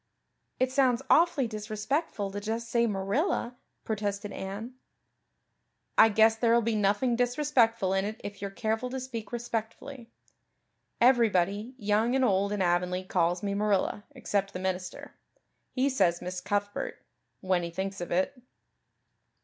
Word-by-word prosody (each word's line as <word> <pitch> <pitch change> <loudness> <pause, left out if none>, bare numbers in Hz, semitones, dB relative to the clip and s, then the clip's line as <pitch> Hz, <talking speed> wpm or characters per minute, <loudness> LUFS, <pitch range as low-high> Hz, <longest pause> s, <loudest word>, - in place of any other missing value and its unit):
"It 255 0 +2
sounds 260 -2 +2
awfully 335 -5 +4
disrespectful 215 - -3
to 205 - -4
just 225 +3 -4
say 235 -1 +3
Marilla," 235 - -1 0.3
protested 205 -1 -3
Anne. 205 +6 -6 1.2
"I 225 - +7
guess 220 +1 +5
there'll 235 +1 +3
be 230 0 0
nothing 210 +4 +2
disrespectful 240 -5 +2
in 195 0 +1
it 215 +2 -4
if 205 -1 -7
you're 200 - -3
careful 220 +4 -2
to 260 +1 -4
speak 235 -5 -6
respectfully. 235 +2 -5 0.9
Everybody, 225 -2 +3
young 215 +2 +1
and 265 -1 +3
old, 200 -1 +2
in 205 -2 0
Avonlea 180 +1 +1
calls 175 -1 0
me 200 -1 -1
Marilla 205 0 0
except 200 -6 -1
the 180 - -4
minister. 185 -1 -4 0.5
He 260 +1 0
says 185 -11 +2
Miss 180 0 -5
Cuthbert 205 0 -3 0.4
when 185 -2 +1
he 170 - -4
thinks 190 +2 -4
of 175 - -4
it." 190 +8 -1
215 Hz, 140 wpm, -29 LUFS, 195-240 Hz, 1.2 s, I